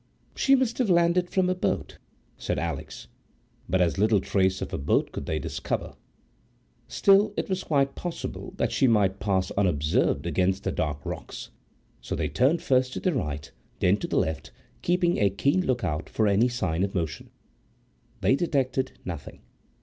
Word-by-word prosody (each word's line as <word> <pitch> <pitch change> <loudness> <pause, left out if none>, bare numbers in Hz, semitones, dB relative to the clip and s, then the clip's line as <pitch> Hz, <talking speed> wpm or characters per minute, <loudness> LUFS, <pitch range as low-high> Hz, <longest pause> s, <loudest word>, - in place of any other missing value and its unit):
"She 275 - +4
must 255 -2 0
have 245 -5 +2
landed 175 0 +3
from 190 -1 +1
a 185 - +2
boat," 185 - -2 0.4
said - - -3
Alix; - - -5 0.6
but 95 0 +2
as 90 +2 +1
little 105 0 +4
trace 95 0 +1
of - - -5
a - - -2
boat 70 - +1
could - - -6
they 80 - -1
discover. 75 - -3 0.9
Still 200 +1 +4
it - - -1
was 190 0 -1
quite 140 -2 +1
possible 175 -2 -6
that - - 0
she 135 - +3
might 100 -4 +2
pass 95 -2 0
unobserved 75 -5 +1
against 90 +3 0
the - - -1
dark 75 -2 -3
rocks, - - -7 0.5
so - - -4
they - - -1
turned 140 +7 +2
first 130 -1 +2
to - - -3
the 185 - 0
right, 75 - -3 0.3
then 90 +2 +3
to - - -4
the - - -1
left, 80 -3 -1 0.3
keeping 175 0 +1
a 100 - +4
keen 140 - +1
look 130 -7 -1
out 75 -4 -2
for 110 - +1
any 100 +4 +4
sign 95 -9 -1
of 100 0 -2
motion. 80 -5 -3 0.9
They 130 - +4
detected 135 -4 0
nothing. 85 -5 -7
110 Hz, 175 wpm, -26 LUFS, -, 0.9 s, She